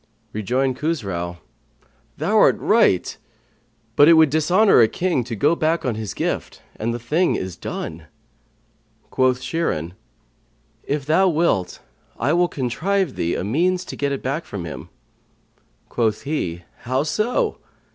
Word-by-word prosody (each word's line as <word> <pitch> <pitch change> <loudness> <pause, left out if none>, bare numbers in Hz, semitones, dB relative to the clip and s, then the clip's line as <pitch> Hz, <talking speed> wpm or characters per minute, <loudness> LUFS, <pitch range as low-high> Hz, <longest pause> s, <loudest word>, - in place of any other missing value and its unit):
'" - - -41
Rejoined 125 +5 -1
Khusrau, 95 - -3 0.8
"Thou - - -1
art - - +5
right, - - +2 0.8
but 145 - +7
it - - +9
would 160 -3 +5
dishonour 175 - +4
a 115 - +6
king 175 -1 -1
to 120 -2 -5
go 145 +10 +2
back 160 0 0
on 125 - 0
his 110 -1 -5
gift; - - -3 0.2
and 115 +2 -2
the 120 - -3
thing 155 +10 +1
is 95 -2 -4
done." - - -6 1.0
Quoth 130 -1 +2
Shirin, 90 - -2 0.9
"If 145 -1 -3
thou 165 +6 +3
wilt, 150 - 0 0.4
I 140 +6 +1
will 175 +1 +3
contrive 165 +5 -1
thee 85 - -1
a - - -3
means 175 - 0
to - - -7
get 140 -1 -1
it 140 - -4
back 140 +6 -2
from 95 -4 -6
him." 70 -5 -8 1.0
Quoth 110 -3 -1
he, 90 - -3 0.2
"How 130 +3 -1
so?" 235 - -1
140 Hz, 145 wpm, -21 LUFS, 110-165 Hz, 1.0 s, it